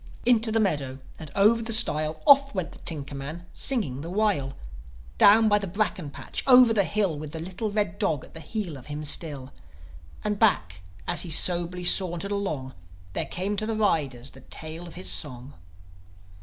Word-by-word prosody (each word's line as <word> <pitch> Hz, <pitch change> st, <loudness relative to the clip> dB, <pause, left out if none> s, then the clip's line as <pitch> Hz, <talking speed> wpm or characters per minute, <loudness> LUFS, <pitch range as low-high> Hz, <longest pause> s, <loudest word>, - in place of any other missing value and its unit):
Into 230 Hz, -2 st, +2 dB
the 225 Hz, -, +1 dB
meadow 145 Hz, -10 st, -1 dB, 0.2 s
and 155 Hz, -, -9 dB
over 215 Hz, +4 st, +3 dB
the 230 Hz, 0 st, -5 dB
stile, 155 Hz, -8 st, +4 dB
Off 275 Hz, -3 st, +5 dB
went 185 Hz, -3 st, -3 dB
the -, -, -14 dB
tinker 145 Hz, -4 st, -4 dB
man, 150 Hz, +5 st, -8 dB
singing 205 Hz, -, 0 dB
the 165 Hz, -, -7 dB
while; 185 Hz, -9 st, -1 dB, 0.6 s
Down 220 Hz, +2 st, +6 dB
by 210 Hz, -1 st, +3 dB
the 200 Hz, -, -5 dB
bracken 185 Hz, -5 st, -3 dB
patch, -, -, -7 dB
over 250 Hz, -3 st, +7 dB
the 200 Hz, -3 st, +2 dB
hill, 195 Hz, -8 st, -1 dB
With 150 Hz, -1 st, -8 dB
the 160 Hz, -, -5 dB
little 185 Hz, +6 st, -5 dB
red 205 Hz, -4 st, -2 dB
dog 150 Hz, -4 st, -1 dB
at -, -, -19 dB
the 160 Hz, -, -9 dB
heel 180 Hz, -4 st, -5 dB
of 130 Hz, -, -14 dB
him 150 Hz, +1 st, -6 dB
still. 145 Hz, -3 st, 0 dB, 0.7 s
And 210 Hz, -1 st, -2 dB
back, 90 Hz, -, +1 dB, 0.3 s
as 175 Hz, -, 0 dB
he 175 Hz, -, -3 dB
soberly 175 Hz, +2 st, +4 dB
sauntered 185 Hz, +1 st, +2 dB
along, 155 Hz, -10 st, -4 dB, 0.4 s
There -, -, -2 dB
came 195 Hz, +3 st, -3 dB
to 215 Hz, -, -3 dB
the 225 Hz, -, -2 dB
riders 140 Hz, -, -1 dB
the 130 Hz, -, -16 dB
tail 160 Hz, +5 st, -9 dB
of 170 Hz, -, -13 dB
his 95 Hz, -, -5 dB
song. 125 Hz, +7 st, -3 dB
175 Hz, 185 wpm, -25 LUFS, 145-210 Hz, 0.7 s, over